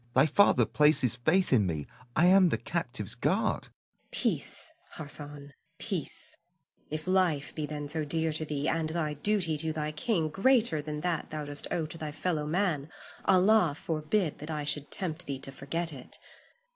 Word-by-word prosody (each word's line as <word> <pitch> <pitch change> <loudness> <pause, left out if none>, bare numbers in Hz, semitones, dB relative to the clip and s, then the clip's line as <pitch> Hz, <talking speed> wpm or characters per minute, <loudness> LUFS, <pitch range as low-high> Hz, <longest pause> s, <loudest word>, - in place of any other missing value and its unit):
Thy 135 +2 +6
father 200 +7 +4
places 150 -6 +3
faith 180 +1 +3
in 105 -6 +4
me. 80 -4 -3 0.3
I 170 - +4
am 185 0 +6
the 115 - 0
captive's 120 - -4
guard. 185 - 0
Zuleika. - - -16 0.4
Peace, 320 - 0 0.2
Hassan, 145 -2 -6 0.2
peace; - - -1 0.5
if 155 +1 -4
life 180 -6 +1
be 155 -2 -3
then 150 -1 -5
so 155 +1 0
dear 160 +1 0
to 155 - 0
thee, 150 -1 -2
and 160 -1 0
thy 160 -2 -1
duty 170 0 +1
to 160 +1 +3
thy 155 -1 -2
king 160 0 0
greater 220 - +3
than 150 0 -5
that 175 -2 -1
thou 150 -1 -4
dost 145 0 0
owe 165 - 0
to 160 +2 -6
thy 155 -2 -4
fellow 155 0 -1
man, 160 -4 0 0.4
Allah 185 -4 +4
forbid 160 +2 -1
that 150 - -8
I 150 -2 -2
should 145 0 0
tempt 180 -3 -3
thee 140 -1 -3
to 135 - -7
forget 160 +5 -3
it. 130 -3 -7
155 Hz, 175 wpm, -29 LUFS, 145-175 Hz, 0.5 s, Thy